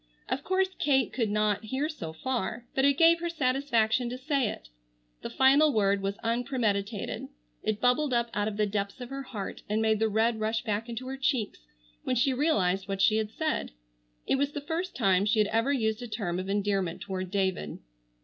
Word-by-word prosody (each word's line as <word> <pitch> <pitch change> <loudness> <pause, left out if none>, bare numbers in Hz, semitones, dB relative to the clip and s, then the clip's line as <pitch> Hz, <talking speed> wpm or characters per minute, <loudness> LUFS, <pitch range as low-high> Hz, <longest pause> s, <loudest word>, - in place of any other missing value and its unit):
Of 265 +2 -2
course 375 +1 +1
Kate 270 -3 +2
could 230 -4 0
not 210 0 +1
hear 265 +6 -1
so 175 - -6
far, 240 +6 -3
but 270 - +2
it 280 0 +4
gave 335 +1 +6
her 345 0 -2
satisfaction 255 -6 +1
to 250 - -5
say 270 -3 0
it. - - -8 0.5
The - - -5
final 280 +3 +5
word 200 -4 +2
was 195 +1 -2
unpremeditated. 225 -4 -1 0.3
It 215 -1 -1
bubbled 250 +4 +2
up 235 -1 +1
out 205 0 0
of 210 -1 -4
the 210 - +3
depths 200 +2 -3
of 245 0 -8
her 275 0 -4
heart 215 -7 -6
and 210 +1 +1
made 220 -1 +2
the 220 0 +2
red 220 +2 +1
rush 220 +1 -1
back 220 0 -2
into 235 +2 -5
her 265 +1 -5
cheeks 265 -5 -1 0.4
when - - 0
she 255 +3 +2
realized 195 - +1
what 195 -1 -3
she 215 +3 +4
had 215 -1 -1
said. 310 - -2 0.5
It - - +2
was 285 +1 0
the 290 - -4
first 330 +5 -3
time 195 -5 +3
she 220 +2 +2
had 210 -1 +3
ever 230 +5 +1
used 220 -4 0
a 245 - -5
term 200 -6 -3
of 185 +1 -5
endearment 195 -3 0
toward 185 -2 -4
David. 190 - -1
225 Hz, 205 wpm, -28 LUFS, 205-270 Hz, 0.5 s, gave